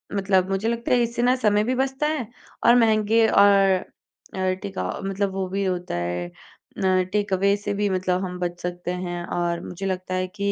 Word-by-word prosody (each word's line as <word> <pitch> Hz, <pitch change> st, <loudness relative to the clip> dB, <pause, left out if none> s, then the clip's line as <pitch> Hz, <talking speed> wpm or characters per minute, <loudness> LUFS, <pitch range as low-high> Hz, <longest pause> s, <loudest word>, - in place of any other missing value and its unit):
मतलब 190 Hz, -1 st, +2 dB
मुझे 195 Hz, +3 st, -1 dB
लगता 235 Hz, 0 st, -2 dB
है 245 Hz, -, +4 dB
इससे 235 Hz, +1 st, -2 dB
ना 250 Hz, +1 st, +4 dB
समय 210 Hz, -4 st, +2 dB
भी 250 Hz, +4 st, 0 dB
बचता 265 Hz, +3 st, 0 dB
है 300 Hz, -8 st, -2 dB, 0.4 s
और 235 Hz, -, +7 dB
महँगे 225 Hz, -1 st, +4 dB
और 195 Hz, -2 st, +4 dB, 0.5 s
अ, 185 Hz, -1 st, 0 dB
टेकअ 195 Hz, -, -4 dB, 0.2 s
मतलब 195 Hz, 0 st, -1 dB
वो 190 Hz, -1 st, -2 dB
भी 200 Hz, +1 st, -1 dB
होता 180 Hz, -, -2 dB
है 85 Hz, 0 st, -2 dB
अ, 185 Hz, -, -2 dB
टेकअवे 200 Hz, -1 st, +2 dB
से 205 Hz, 0 st, -3 dB
भी 205 Hz, 0 st, 0 dB
मतलब 185 Hz, 0 st, 0 dB
हम 180 Hz, 0 st, -6 dB
बच 175 Hz, 0 st, -3 dB
सकते 180 Hz, 0 st, -4 dB
हैं। 175 Hz, -1 st, -4 dB
और 175 Hz, -1 st, -2 dB
मुझे 180 Hz, +2 st, -6 dB
लगता 185 Hz, 0 st, -3 dB
है 185 Hz, 0 st, -1 dB
कि 200 Hz, +2 st, -2 dB
195 Hz, 195 wpm, -24 LUFS, 180-210 Hz, 0.5 s, और